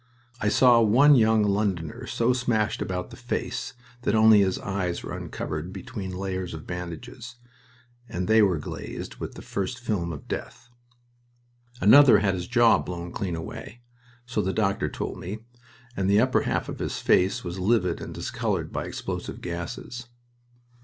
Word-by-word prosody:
I 105 - +1
saw 120 +1 +6
one 130 +7 +6
young 110 -4 +4
Londoner 105 +3 -1
so 120 +2 +1
smashed 115 -4 0
about 90 -1 -3
the - - -9
face - - -4 0.3
that 110 - +1
only 110 -1 +7
his 95 -2 +2
eyes 95 -3 -3
were - - -5
uncovered 75 +4 -5
between 100 -1 -6
layers 95 -1 -4
of 80 - -9
bandages, 90 +8 -7 0.7
and 90 +1 -3
they 110 0 +5
were 95 -5 +3
glazed 75 - -7
with - - -6
the - - -10
first 100 +6 -3
film 100 -8 -2
of 75 - -9
death. 125 - -6 1.1
Another 130 +6 +8
had 100 -2 +1
his 90 -1 -4
jaw 120 -1 +5
blown 85 -1 -6
clean 95 -5 -3
away, 100 +7 -8 0.4
so 125 - -1
the 95 +1 -1
doctor 100 -2 0
told - - -5
me, 105 +5 -7 0.5
and 95 0 0
the 100 +1 +5
upper - - +3
half - - -1
of - - -6
his - - -3
face 95 +2 +2
was 90 +1 -5
livid 110 +5 +1
and - - -7
discolored - - -2
by - - -2
explosive - - -5
gases. 90 +7 -6
100 Hz, 160 wpm, -26 LUFS, 90-115 Hz, 1.1 s, Another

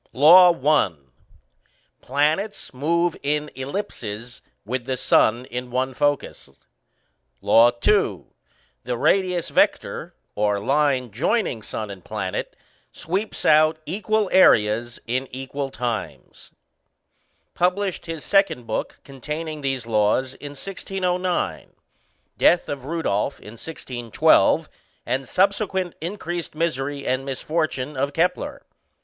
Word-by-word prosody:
LAW 175 +6 +8 0.2
I. 150 - +4 1.1
Planets 155 +11 -1
move 170 +6 +1
in 150 +1 -1
ellipses, 125 - -6 0.2
with 120 +2 -3
the 130 -1 -2
Sun 120 +1 +3
in 125 0 -6
one 130 +1 -1
focus. 145 - -1 0.9
LAW 115 +4 +5 0.2
II. 155 - +2 0.6
The 125 0 -3
radius 180 +3 +1
vector - - 0 0.2
(or 105 -1 +1
line 135 +1 +1
joining 150 - 0
sun 105 0 -5
and 95 -3 -11
planet) - - -4 0.4
sweeps 195 +6 -4
out 155 +1 +5
equal 215 +4 0
areas 115 - +4
in 130 +3 -2
equal 135 +2 -5
times. 120 -4 -5 1.0
Published 180 0 0
his 165 -2 -6
second 190 -11 +2
book 110 - -4
containing 150 +3 -6
these 135 -3 -2
laws 115 +4 +1
in 145 +1 -9
1609. 180 +2 -3 0.7
Death 175 - +4
of 140 -3 -5
Rudolph 140 -6 -1
in 105 - -11
1612, 120 -2 +1 0.4
and 130 -1 -2
subsequent 190 -2 +1
increased 175 -2 -5
misery 145 -3 -2
and 130 +1 0
misfortune 145 0 -2
of 140 +2 -1
Kepler. 175 +4 -1
145 Hz, 105 wpm, -23 LUFS, 125-175 Hz, 1.1 s, LAW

